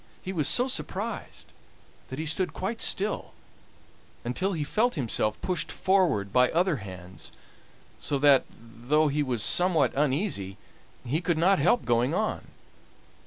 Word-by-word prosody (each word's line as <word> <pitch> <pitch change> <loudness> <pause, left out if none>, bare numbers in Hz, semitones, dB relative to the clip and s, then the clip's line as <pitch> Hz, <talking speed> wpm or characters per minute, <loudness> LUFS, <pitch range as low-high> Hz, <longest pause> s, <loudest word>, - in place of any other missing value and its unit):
He 190 - -4
was 155 -6 +1
so 250 - +4
much 260 - -2
surprised - - -5 0.5
that 130 - -7
he 160 - -3
stood 170 +4 0
quite 225 +5 -4
still, 205 +2 -2 0.9
until 185 +12 -1
he 155 -4 -2
felt 220 +10 +1
himself 110 - -1
pushed 180 -2 -2
forward 175 - +1
by 125 0 +5
other 175 -1 +1
hands, 95 -3 -9 0.7
so 140 - -1
that, 140 -1 +5
though 120 +7 -1
he 150 +1 0
was 125 -6 -1
somewhat 175 - +2
uneasy, 135 - -1 0.5
he 145 +7 -1
could 175 -2 0
not 185 +3 +4
help 180 +12 +3
going 120 +6 +2
on. 215 +2 -2
150 Hz, 145 wpm, -27 LUFS, 120-185 Hz, 0.9 s, by